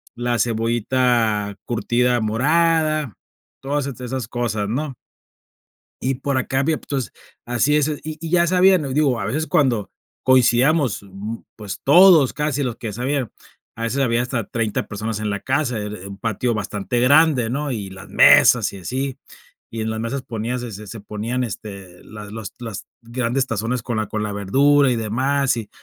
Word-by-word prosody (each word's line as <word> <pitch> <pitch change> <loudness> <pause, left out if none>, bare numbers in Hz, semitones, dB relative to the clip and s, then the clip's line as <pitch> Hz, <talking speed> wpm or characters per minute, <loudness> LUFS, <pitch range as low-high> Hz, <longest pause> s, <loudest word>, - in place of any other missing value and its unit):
la 120 0 -1
cebollita 115 -2 +1
curtida 120 +1 +1
morada, 155 - +1 0.4
todas 140 +1 -2
est 130 -2 -7
esas 125 -2 -4
cosas, 110 -4 -2
¿no? 135 +4 -3 1.1
Y 130 +1 0
por 135 +1 -2
acá 130 +1 0
había 155 +3 +1
p - - -18
entonces 135 -4 -3 0.3
así 120 +5 +2
es, 150 0 +2 0.2
y 155 0 -6
y 165 - -5
ya 175 0 +3
sabían, 185 -2 +4
o - - -4
digo, 140 -5 +2
a 100 - -3
veces 150 +10 -2
cuando 120 -8 +1 0.3
coincidíamos, 130 -1 +3
mm 100 +4 -7 0.2
pues, 105 -3 -7
todos, 165 -2 +7
casi 150 -1 -1
los 125 -3 -2
que 115 - -6
ya 105 - -5
sabían, 130 +2 -2 0.4
a 115 - -5
veces 130 +4 -1
había 120 -2 +2
hasta 120 -4 -2
30 115 -3 -2
personas 105 +1 -4
en 105 -1 -2
la 100 0 -2
casa, 130 -3 -1
era 105 0 -5
er 95 +2 -10
un 100 - -9
patio 115 +3 -1
bastante 105 +2 -2
grande, 140 -2 +4
¿no? 140 +2 -2
Y 105 -5 -4
las 95 0 -11
mesas - - +6
y - - -8
así, 130 +7 -3 0.5
y 115 -1 -5
en 110 - -2
las 110 0 -3
mesas 130 +4 -3
ponías, 120 +1 -4
eh 120 - -6
se 105 +1 -9
se 115 - -8
ponían, 110 +5 -3
este, 100 -4 -8
las 105 -1 -10
los 110 -2 -7
las 115 -4 -7 0.2
grandes 125 +2 -1
tazones 115 +2 -2
con 115 -1 -3
la 110 - -1
con 105 +1 -3
la 105 - -3
verdura 135 +7 +3
y - - +1
demás, 130 +5 0
y 110 -3 -6
120 Hz, 185 wpm, -21 LUFS, 110-140 Hz, 1.1 s, todos